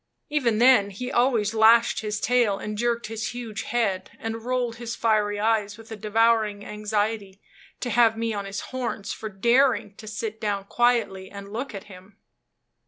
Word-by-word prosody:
Even 250 -7 +1
then 235 -4 +5
he 250 +6 -6
always 235 -4 +2
lashed 225 +1 +5
his 210 -1 -3
tail, 235 -5 +2
and 210 +1 -5
jerked 235 +1 0
his 220 +1 -4
huge 230 -3 -5
head, 220 -6 -1
and 225 0 -5
rolled 245 -2 -1
his 235 0 -5
fiery 210 -2 +1
eyes 210 -1 +1
with 225 0 -14
a - - -4
devouring 215 -1 +1
anxiety 210 -1 -2 0.4
to 245 - -2
have 225 0 +4
me 230 0 -1
on 200 -1 -4
his 195 0 -5
horns 240 -5 -3
for 220 - -6
daring 235 +2 +2
to 215 - -11
sit 220 +1 -5
down 205 -2 -1
quietly 225 -5 +1
and 200 0 -10
look 245 0 -4
at 195 - -6
him. 195 0 -15
220 Hz, 170 wpm, -25 LUFS, 205-235 Hz, 0.4 s, then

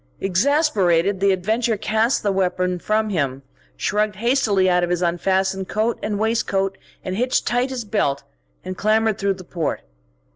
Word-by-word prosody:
Exasperated, 195 - +2
the 200 0 +3
adventurer 220 +5 0
cast 220 +4 +1
the 205 - +1
weapon 180 -1 0
from 215 +3 0
him, 140 -6 -1 0.3
shrugged 210 0 0
hastily 220 -4 +2
out 180 -1 +3
of 175 - 0
his 180 0 0
unfastened 190 +2 0
coat 220 +3 0
and 210 -1 -2
waistcoat, 200 -3 0 0.3
hitched 230 +8 0
tight 245 +2 +1
his 250 -4 -4
belt, 140 -10 0 0.4
and 185 0 -4
clambered 215 +1 +1
through 200 -1 0
the 185 - -11
port. 170 -2 -3
200 Hz, 150 wpm, -21 LUFS, 185-220 Hz, 0.4 s, the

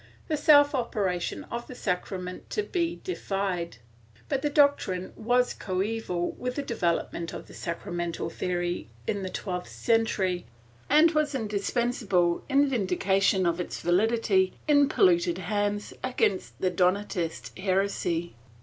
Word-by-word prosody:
viii) - - -26
the 305 - +1
self 290 -1 +6
operation 200 -8 -1
of 235 0 -4
the 255 - -9
sacrament 180 -2 -4
to 425 - -1
be 345 -4 -1
de 370 - -2
fide, 185 - -2 0.5
but 275 -2 0
the 295 - +1
doctrine 280 - +2
was 245 +2 +2
coeval 190 -2 -2
with 250 0 -3
the 285 - -2
development 170 -7 -1
of - - -7
the - - -15
sacramental 175 -1 -4
theory 175 - -2 0.2
in 200 - -1
the 185 - -3
twelfth 180 -1 -4
century 200 -6 0 0.4
and 310 +3 +6
was 305 -2 +1
indispensable 210 -5 0
in 280 +1 +4
vindication 195 -4 +2
of 170 0 +1
its - - -5
validity 190 0 +2
in 285 -1 +5
polluted 175 - +3
hands 205 +2 -2
against 245 -7 0
the 185 - +1
Donatist 180 -1 -1
heresy. 185 -3 0
195 Hz, 135 wpm, -27 LUFS, 180-245 Hz, 0.5 s, self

